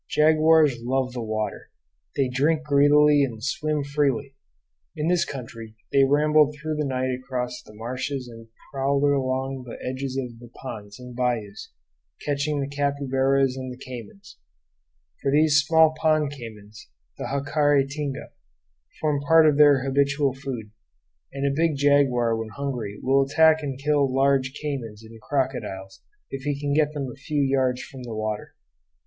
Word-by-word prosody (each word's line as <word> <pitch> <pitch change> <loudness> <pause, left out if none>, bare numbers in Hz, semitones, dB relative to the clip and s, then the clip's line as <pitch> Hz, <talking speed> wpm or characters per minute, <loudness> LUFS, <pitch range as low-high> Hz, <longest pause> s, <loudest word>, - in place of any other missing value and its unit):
Jaguars 155 -3 +4
love 125 +1 -1
the 125 - -4
water. 110 -1 -4 0.5
They 135 -2 +1
drink 150 +5 +1
greedily 145 0 +5
and 115 -5 -4
swim 150 +2 -1
freely. 140 -2 -1 0.6
In 150 +2 -1
this 175 -1 +2
country 115 -4 -8 0.2
they 140 - +5
rambled 150 +1 +3
through 155 +1 -4
the 150 - -1
night 130 -1 -1
across 125 -1 -4
the 105 - -16
marshes 130 +3 -4
and 115 -1 -12 0.3
prowled 140 +1 0
along 135 -1 0
the 115 - -7
edges 130 +1 -4
of 120 -3 -5
the 120 - -12
ponds 105 -6 -8
and 125 -1 -10
bayous, 120 -5 -3 0.5
catching 145 +1 -1
the 135 - -2
capybaras 135 -2 +1
and 130 -1 -6
the 125 - -9
caymans; 130 - -11 0.8
for 135 - 0
these 155 +1 +4
small 160 +1 +4
pond 155 -2 +1
caymans, 110 -6 -11 0.3
the - - -4
jacare 145 0 +2
tinga, 140 -1 -5 0.7
form 150 -2 0
part 160 0 +6
of 150 -2 +3
their 145 -3 +6
habitual 140 0 +1
food, 130 -6 -6 0.6
and 140 0 -3
a 140 - +1
big 160 +1 +1
jaguar 135 -5 +3
when 110 0 -4
hungry 120 -6 -4
will 135 +1 +3
attack 160 +3 +4
and 135 -3 -4
kill 140 -1 +1
large 135 0 +2
caymans 120 -8 -5
and 110 0 -13
crocodiles 125 -9 -3 0.3
if 135 - -5
he 145 0 -2
can 145 0 -1
get 150 0 +2
them 140 -2 -3
a - - -11
few 145 +1 -1
yards 130 -2 +1
from 135 - -11
the 120 -3 -6
water. 110 -1 -4
135 Hz, 155 wpm, -24 LUFS, 125-145 Hz, 0.8 s, part